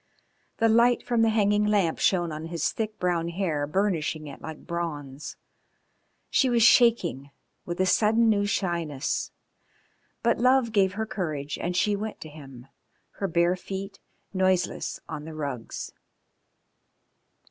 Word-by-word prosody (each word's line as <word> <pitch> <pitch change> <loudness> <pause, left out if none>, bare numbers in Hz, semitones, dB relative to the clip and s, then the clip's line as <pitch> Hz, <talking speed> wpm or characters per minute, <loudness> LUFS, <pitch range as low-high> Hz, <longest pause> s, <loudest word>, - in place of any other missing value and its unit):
The 225 - +3
light 235 +2 +4
from 240 -2 +1
the 225 - +4
hanging 210 -1 +2
lamp 205 -6 +1
shone 175 -3 +2
on 155 +1 -6
his 165 -1 -1
thick 215 -1 -4
brown 175 -2 0
hair 165 -5 -1
burnishing 160 -3 -1
it 145 - -10
like 160 -1 -8
bronze. 150 -5 -5 1.0
She 265 - +3
was 235 -2 +3
shaking 215 - +4 0.4
with 175 0 -4
a 185 - +3
sudden 220 +4 +3
new 205 -2 +2
shyness, 170 -8 -1 0.9
but 235 -1 +2
love 255 -1 +3
gave 195 -3 +3
her 220 +2 -2
courage 155 - -4
and 175 +1 -2
she 210 +2 +2
went 215 +1 -5
to 155 - -8
him, 135 -5 -12 0.5
her 195 - 0
bare 170 +1 +2
feet 195 +2 -7 0.3
noiseless 185 -2 0
on 155 -3 -6
the 160 0 -8
rugs. 140 -6 -5
185 Hz, 140 wpm, -26 LUFS, 155-215 Hz, 1.0 s, light